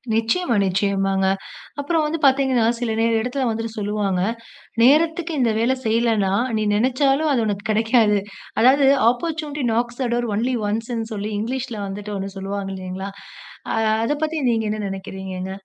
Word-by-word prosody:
நிச்சயமா, 235 +5 +1
நிச்சயமாங்க. 195 0 +1 0.5
அப்பறம் 315 +3 +1
வந்து 315 +2 -2
பாத்தீங்கன்னா 265 -3 +3
சில 240 -2 -1
நே 225 - +3 0.2
இடத்துல 250 +1 -1
வந்து 225 0 -2
சொல்லுவாங்க. 205 -3 -1 0.6
நேரத்துக்கு 325 +5 +3
இந்த 240 -3 +3
வேலை 245 +3 +2
செய்லன்னா 220 -4 +2 0.2
நீ 215 - 0
நினைச்சாலும் 270 +6 +2
அது 235 -4 +1
உனக்குக் 205 0 -2
கிடைக்காது. 220 -1 +3 0.4
அதாவது 270 +3 +5 0.2
"ஆப்பர்சுனிட்டி 300 +1 -3
நாக்ஸ் 240 +2 -1
தெ 245 - 0
டோர் 240 0 -1
ஒன்லி 250 +4 0
ஒன்ஸ்னு" 225 +1 -3
சொல்லி 205 +1 -4
இங்கிலீஷ்ல 240 +1 -3
வந்துட்டு 205 +1 -6
ஒண்ணு 195 0 -4
சொல்லுவாங்க 195 0 -4
இல்லைங்களா? 185 +1 -6 0.6
ஆ - - 0 0.3
அதை 290 - +1
பத்தி 315 +1 -3
நீங்க 225 -1 0
என்ன 215 - -2
நினைக்கிறீங்கங்க? 190 -1 -6
225 Hz, 145 wpm, -21 LUFS, 200-260 Hz, 0.6 s, அதாவது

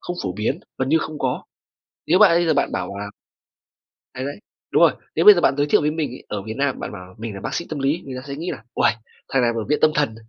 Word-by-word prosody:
không 175 - -5
phổ 95 -2 -2
biến, 105 +3 -2 0.2
gần 130 - 0
như 160 +3 +4
không 155 -1 -5
có. 130 -2 -1 0.7
Nếu 180 +4 +4
bạn 210 -4 +8
bây 175 - +2
giờ 160 - +3
bạn 140 - +1
bảo 100 - -4
là 100 0 -5 1.1
đấy, 130 - -4
đấy, 145 +5 -5 0.3
đúng - - +3
rồi, - - +7 0.2
nếu - - +2
bây 420 - +12
giờ - - 0
bạn 140 - +3
giới 145 - +2
thiệu - - +4
với 150 0 +1
mình 155 -3 -2
ấy, 125 - -10
ở 105 - -4
Việt 110 +2 -6
Nam 140 -2 0
bạn - - -5
bảo 90 -2 -10
mình 110 -1 -5
là 100 - -7
bác - - -4
sĩ 170 - -2
tâm 155 - -4
lý, 140 +6 0
người 135 -2 -6
ta 140 - -14
sẽ 140 - -5
nghĩ 170 +4 -4
là - - -8
"Uầy, - - +3 0.4
thằng 135 - +2
này 120 -1 +3
ở 115 - -2
viện 150 - +2
tâm 155 - +5
thần", 145 -7 +1
140 Hz, 290 wpm, -22 LUFS, 110-155 Hz, 1.1 s, bây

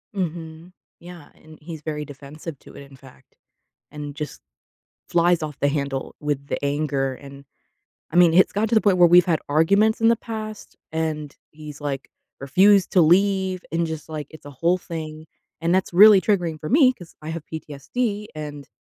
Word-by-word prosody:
Mhm. 165 -2 -5 0.3
Yeah. 170 -3 -12
And 155 0 -16
he's 160 -1 -8
very 150 -1 -4
defensive 145 +3 -10
to - - -16
it, - - -10
in 135 - -15
fact, 130 0 -19 0.6
and 145 -1 -7
just 150 0 -7 0.7
flies 175 -1 +2
off 150 -3 -6
the 145 - +2
handle 140 -2 -3
with 145 -2 -3
the - - -4
anger. 140 -2 -1
And, 140 +1 -13 0.7
I - - -7
mean, 175 -2 +6
it's 185 +3 +5
gotten 210 +2 0
to 230 - +1
the 220 - +5
point 195 -3 +3
where 175 -1 +7
we've 175 +1 +6
had 165 -3 +1
arguments 200 +9 +3
in 225 - +5
the 230 - +5
past, 215 -2 -8 0.2
and 155 -2 -3 0.2
he's, 150 -1 -11
like, 140 -2 -4 0.3
refused 190 +8 +4
to 185 - +5
leave 190 +2 +2
and 170 +1 0
just, 160 -1 -6
like, 155 -3 -5
it's 155 -2 -15
a 145 - -9
whole 170 +7 +1
thing. 155 -3 -7 0.4
And 165 +1 +1
that's 190 -2 -1
really 205 +1 +8
triggering 175 -7 0
for 155 - -6
me 260 -1 +5
'cause 175 -8 -15
I 155 - -7
have 160 -1 -6
PTSD 200 - -4
and, 145 -2 -8
160 Hz, 185 wpm, -23 LUFS, 145-185 Hz, 0.7 s, really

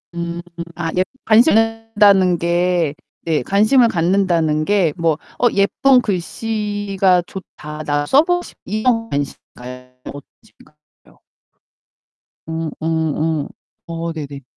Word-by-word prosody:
음. 170 0 -4 0.3
아 165 -1 -3
예 185 - +4 0.2
관심 220 0 +5
갖는다는 210 -5 +3
게 170 -2 0 0.3
네 160 -3 +1
관심을 215 - +3
갖는다는 170 -4 +1
게 195 -5 +2
뭐 165 -2 +2 0.3
'어 245 - +4
예쁜 250 +6 +3
글씨가 205 -2 -1
좋다. 155 -5 -9
나 145 0 0
써 270 - +5
보고 355 +1 0
싶다.' - - -15
이런 225 +2 0
관심인가요? 125 -2 -6 0.2
어떤 145 - -7 0.2
관심인가요? 150 -8 -25 1.3
음 160 0 -3
음 160 -2 -1 0.3
음. - - -8 0.4
어 165 0 -4
네네. 140 -3 -7
175 Hz, 225 characters per minute, -18 LUFS, 160-210 Hz, 1.3 s, 관심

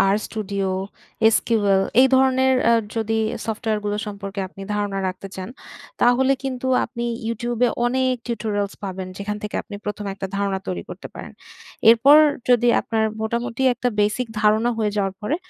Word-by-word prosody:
RStudio, 200 -2 -3 0.7
SQL 205 -4 +2 0.2
এই 265 - +6
ধরনের 260 0 +3
অ্যা 235 0 +5 0.2
যদি 225 0 0 0.3
সফটওয়্যারগুলো 215 -2 -2
সম্পর্কে 200 -1 -6
আপনি 195 +1 -13
ধারণা 205 -1 -2
রাখতে 185 +1 -6
চান, 185 +3 -6 0.5
তাহলে 260 +2 +4
কিন্তু 260 -1 -3 0.2
আপনি 235 -1 -6 0.3
YouTube 235 +1 -3
এ - - +1 0.2
অনেক 260 +1 +1
টিউটোরিয়ালস 210 -4 -2
পাবেন। 190 -1 -5
যেখান 210 +1 -4
থেকে 210 - -4
আপনি 205 - -9
প্রথমে 210 -1 -4
একটা 195 -1 -5
ধারণা 200 -1 -1
তৈরি 90 -2 -3
করতে - - -8
পারেন। - - -8 0.6
এরপর 270 +6 +7 0.3
যদি 240 -1 +4
আপনার 220 -1 -1 0.2
মোটামুটি 235 +3 -2
একটা 245 +1 -2
বেসিক 215 +4 0
ধারণা 215 +2 +3
হয়ে 215 -2 0
যাওয়ার 195 -1 0
পরে, 270 +9 -1
215 Hz, 150 wpm, -22 LUFS, 200-240 Hz, 0.7 s, এরপর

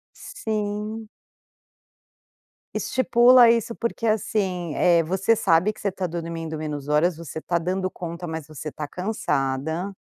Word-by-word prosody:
Sim. 215 0 -4 1.7
Estipula 245 -1 +5
isso, 230 0 +1
porque 230 -1 -2
assim, 190 -6 -1
eh, 170 -1 +4
você 190 +7 +2
sabe 190 +2 +3
que - - -14
você 200 - 0
tá 185 -1 -3
dormindo 165 -1 -5
menos 150 -2 -5
horas, 155 +3 +2
você 160 -1 -7
tá 170 +1 0
dando 185 +2 -2
conta, 170 0 -6
mas 160 -3 -5
você 155 0 -7
tá 150 -1 -6
cansada 160 -3 -2
180 Hz, 130 wpm, -24 LUFS, 160-215 Hz, 1.7 s, Estipula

